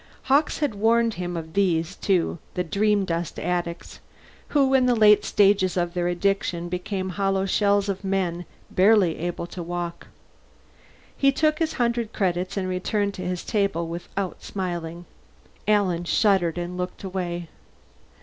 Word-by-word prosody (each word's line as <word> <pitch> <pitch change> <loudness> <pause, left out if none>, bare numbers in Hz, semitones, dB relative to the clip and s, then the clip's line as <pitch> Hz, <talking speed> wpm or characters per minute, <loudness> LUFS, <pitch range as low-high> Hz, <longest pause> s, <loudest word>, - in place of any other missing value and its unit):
Hawkes 285 +3 +2
had 295 -7 0
warned 230 +2 +2
him 175 -2 -4
of 160 -1 -7
these, 180 -2 +1
too 180 -3 0 0.2
the 180 - 0
dreamdust 195 -2 0
addicts, 175 0 -3 0.5
who 275 -2 +2
in 255 -1 +4
the 245 - +3
late 210 -2 +6
stages 195 -2 +3
of 175 -1 0
their 175 -1 0
addiction 175 -1 -1
became 185 +1 -3
hollow 195 0 0
shells 200 +1 +2
of 195 0 -3
men, 185 -3 -1 0.3
barely 190 -3 +4
able 175 +1 -3
to 175 +1 -8
walk. 175 0 -5 1.1
He 275 0 +4
took 305 +2 +1
his 320 -1 0
hundred 235 -2 -1
credits 185 0 -1
and 190 -1 -1
returned 200 +2 -1
to 185 - -7
his 180 -1 -3
table 200 -6 0
without 175 +3 -5
smiling. 175 -3 -4 0.6
Alan 190 -5 +2
shuddered 180 -3 +2
and 175 +1 -4
looked 180 +2 -5
away. 175 -3 -4
185 Hz, 145 wpm, -24 LUFS, 175-205 Hz, 1.1 s, late